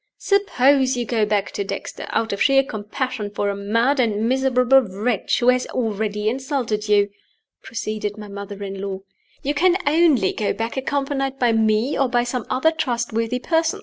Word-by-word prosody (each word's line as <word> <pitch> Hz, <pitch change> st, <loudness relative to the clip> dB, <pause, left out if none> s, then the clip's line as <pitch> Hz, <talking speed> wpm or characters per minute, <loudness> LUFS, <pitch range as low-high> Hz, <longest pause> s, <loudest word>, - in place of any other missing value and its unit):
"Suppose 275 Hz, -9 st, +2 dB
you 240 Hz, -, -1 dB
go 220 Hz, -2 st, 0 dB
back 205 Hz, -1 st, 0 dB
to 200 Hz, -, -3 dB
Dexter, 195 Hz, -, -6 dB
out 225 Hz, -2 st, -1 dB
of 200 Hz, -, -4 dB
sheer 270 Hz, -1 st, +5 dB
compassion 220 Hz, 0 st, -4 dB
for 205 Hz, 0 st, -1 dB
a -, -, -4 dB
mad 230 Hz, +8 st, +1 dB
and 220 Hz, -2 st, +1 dB
miserable 260 Hz, 0 st, +2 dB, 0.2 s
wretch 210 Hz, 0 st, -1 dB
who 245 Hz, -, +3 dB
has 250 Hz, 0 st, +2 dB
already 210 Hz, -3 st, -2 dB
insulted 240 Hz, -4 st, -2 dB
you," 205 Hz, -1 st, +3 dB, 0.5 s
proceeded 215 Hz, -2 st, -4 dB
my 210 Hz, -1 st, -8 dB
mother 200 Hz, 0 st, -7 dB
in 195 Hz, -1 st, -6 dB
law. 195 Hz, -1 st, -4 dB, 0.4 s
"You 285 Hz, -, 0 dB
can 350 Hz, +5 st, +3 dB
only 290 Hz, -, +3 dB
go 210 Hz, -, -1 dB
back 225 Hz, +1 st, -4 dB
accompanied 270 Hz, 0 st, -2 dB
by 245 Hz, -3 st, +2 dB
me, 220 Hz, +3 st, +1 dB
or 270 Hz, -2 st, +2 dB
by 240 Hz, 0 st, +2 dB
some 245 Hz, -1 st, -4 dB
other 290 Hz, +5 st, +2 dB
trustworthy 240 Hz, -5 st, -1 dB
person. 325 Hz, +5 st, 0 dB
235 Hz, 175 wpm, -21 LUFS, 210-265 Hz, 0.5 s, sheer